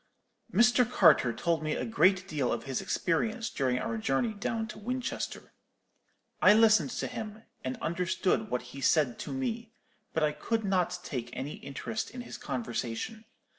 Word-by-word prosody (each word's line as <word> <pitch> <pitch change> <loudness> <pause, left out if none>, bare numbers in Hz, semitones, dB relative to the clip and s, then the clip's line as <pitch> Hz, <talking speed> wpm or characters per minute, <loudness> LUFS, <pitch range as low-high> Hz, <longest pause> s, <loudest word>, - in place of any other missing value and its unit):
"Mr. 240 +2 +4
Carter 125 - +5
told 165 +5 0
me 155 0 -1
a - - -2
great 190 -4 +3
deal 145 -8 0
of - - -2
his 135 -2 -2
experience 220 +7 0
during 130 -3 0
our 115 -2 -2
journey 135 - +1
down 220 +2 -2
to 215 - -9
Winchester. 250 +4 -4 0.9
I 210 - +8
listened 220 +2 +5
to - - -1
him, 215 0 -6 0.2
and 130 0 -3
understood 180 +5 0
what 125 - -1
he 135 - -7
said 135 -5 +3
to - - -5
me; 235 -4 -3 0.4
but 160 - 0
I 150 - +3
could 225 +7 -2
not 180 -2 +1
take 120 -7 -4
any 140 +3 -5
interest 180 +10 -4
in 250 +1 -7
his 245 - -8
conversation. 120 - -4
185 Hz, 165 wpm, -30 LUFS, 135-225 Hz, 0.9 s, I